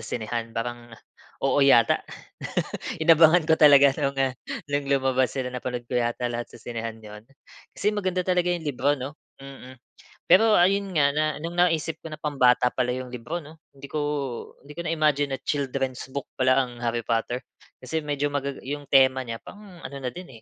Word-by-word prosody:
sinehan, 115 0 -5
parang, 120 +1 -4 0.6
oo 135 +1 +3
yata, 130 -4 +5 1.0
inabangan 160 0 +5
ko 160 - +5
talaga 140 -3 +7
no'ng, 140 0 -1
ah, 135 -1 +1 0.3
no'ng 145 0 -1
lumabas 130 -1 +1
sila, 130 -2 -3
napanood 125 -1 -5
ko 125 - -2
yata 120 +1 0
lahat 120 0 -5
sa - - -13
sinehan 115 -1 -6
'yon. 105 0 -11 0.5
Kasi 205 - -1
maganda 185 -2 -1
talaga 180 -1 +2
yung 175 - -2
libro, 145 0 +1
'no, 140 +1 -5 0.2
mm. 130 -2 -12 0.5
Pero 210 +5 +6
ayun 195 +1 +2
nga, 140 -2 +4
na 150 +2 0 0.2
no'ng 170 +1 -5
naisip 165 -2 +1
ko - - -6
na - - -5
pambata 130 -4 +3
pala 125 -1 -1
yung 130 -1 -6
libro, 150 +8 -5
'no, 155 +2 -14 0.2
hindi 140 0 -10
ko 155 - -2 0.6
hindi 145 +1 -12
ko 170 - -4
na-imagine 150 -3 +1
na - - -11
children's 135 -3 -2
book 140 -1 -5
pala 130 +1 +4
ang 120 -1 -9
Harry 120 0 -1
Potter. 115 +2 -1 0.3
Kasi 160 +6 -3
medyo 145 -1 -1
magaga 140 -1 -2
yung 145 0 -5
tema 130 -1 +5
niya 115 -3 -5
pang 205 - -13 0.2
ano 140 - -7
na 130 - -2
din 135 -8 -11
135 Hz, 180 wpm, -25 LUFS, 125-155 Hz, 1.0 s, talaga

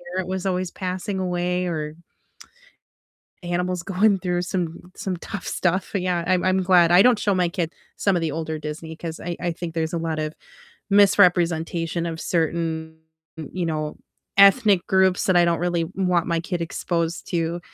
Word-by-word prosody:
parent 185 -1 -2
was 190 0 -3
always 185 -1 -1
passing 185 +1 -4
away 180 0 -1
or 155 -2 -3 1.5
animals 180 0 -2
going 195 +2 +3
through 180 -1 -1
some 180 -1 -4
some 185 -2 -3
tough 195 +3 -7
stuff. 185 +2 -1
Yeah, 180 -3 0
I'm 185 0 +2
I'm 185 0 +2
glad, 175 -2 +5
I 175 +2 +7
don't 245 -1 +5
show 200 -2 +1
my 180 -2 +2
kid 170 -2 -2 0.3
some 200 -2 +2
of 175 - 0
the 160 -2 -1
older 160 0 -3
Disney, 155 +1 -7
'cause 165 0 -6
I 175 0 -4
I 175 - -1
think 165 0 -6
there's 160 0 -1
a - - 0
lot 165 -1 -2
of 155 0 -3 0.6
misrepresentation 175 -4 +3
of 165 -1 -5
certain, 160 -1 -1 0.4
you 170 +3 -4
know, 155 -2 -3 0.4
ethnic 200 -2 +6
groups 190 -1 +3
that 185 - +2
I 175 - +6
don't 170 -1 +1
really 175 -1 0
want 180 -3 +1
my 170 -1 0
kid 175 +1 -3
exposed 170 0 -2
to, 170 0 -1
175 Hz, 175 wpm, -23 LUFS, 165-185 Hz, 1.5 s, I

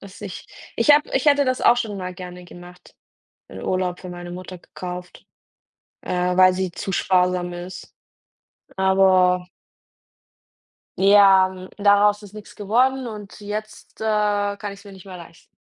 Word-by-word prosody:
Dass 200 0 -13
ich 195 -4 -8 0.3
ich 230 +6 +3
habe 295 +1 +4
ich 265 +3 0
hätte 285 -1 +5
das 255 0 -1
auch 240 - +5
schon 220 -4 -3
mal 185 -1 -6
gerne 180 -1 -10
gemacht, 175 0 -15 0.5
einen 95 - -10
Urlaub 185 -1 -2
für 180 - -9
meine 175 0 -8
Mutter 185 0 -8
gekauft, 180 +1 -9 0.8
äh, - - -5 0.2
weil 185 0 +6
sie 185 -1 -2
zu 195 - -5
sparsam 180 -1 +1
ist, 180 +1 -9 0.8
aber 185 -1 +3 1.5
Ja, 195 -1 +6
hm, 185 0 -10
daraus 205 +1 +3
ist 205 0 -13
nix 210 -1 -11
geworden 250 +5 +1
und 210 -2 -9
jetzt, 210 +1 -8
äh, 220 - -4 0.5
kann 205 -1 -6
ich 200 - -13
es - - -20
mir 200 - -12
nicht 190 0 -14
mehr 185 -1 -9
leisten. 170 -1 -15
190 Hz, 160 wpm, -22 LUFS, 180-205 Hz, 1.5 s, weil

